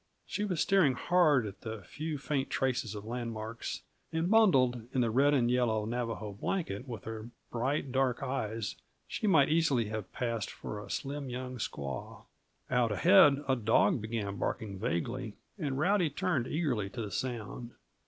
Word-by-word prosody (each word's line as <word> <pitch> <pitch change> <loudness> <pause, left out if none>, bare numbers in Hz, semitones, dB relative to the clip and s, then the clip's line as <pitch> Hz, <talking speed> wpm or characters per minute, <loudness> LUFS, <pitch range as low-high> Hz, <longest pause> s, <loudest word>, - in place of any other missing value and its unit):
She 210 - -2
was 180 -6 -1
staring 180 -10 +4
hard 155 -6 +4
at 100 -1 -8
the 110 -3 -6
few, 155 - -4
faint 140 -1 -1
traces 125 -4 0
of 105 0 -7
landmarks; 115 -1 -4 0.3
and, 165 +3 0
bundled 130 - +4
in 130 - +3
the 115 -2 +1
red 140 +5 +4
and 120 -3 +3
yellow 115 -4 +2
Navajo 115 -3 -3
blanket, 125 - -3
with 115 -3 -6
her 110 0 -6 0.2
bright, 130 +3 -1
dark 130 -1 +1
eyes, 115 -5 -2 0.3
she 215 - -2
might 155 -8 +5
easily 145 -9 +2
have 110 -3 -5
passed 115 -4 -2
for 105 - -6
a - - -12
slim 140 0 -3
young 125 0 -5
squaw. 70 - -5 0.5
Out 125 -3 +3
ahead, 135 - +6
a 130 - +3
dog 120 - +3
began 105 -2 -3
barking 100 +1 -3
vaguely, 110 +5 -2 0.2
and 140 -5 -1
Rowdy 180 +2 +3
turned 145 -5 0
eagerly 130 - 0
to 100 - -5
the 105 - -6
sound. 120 0 -4
125 Hz, 165 wpm, -31 LUFS, 110-145 Hz, 0.5 s, ahead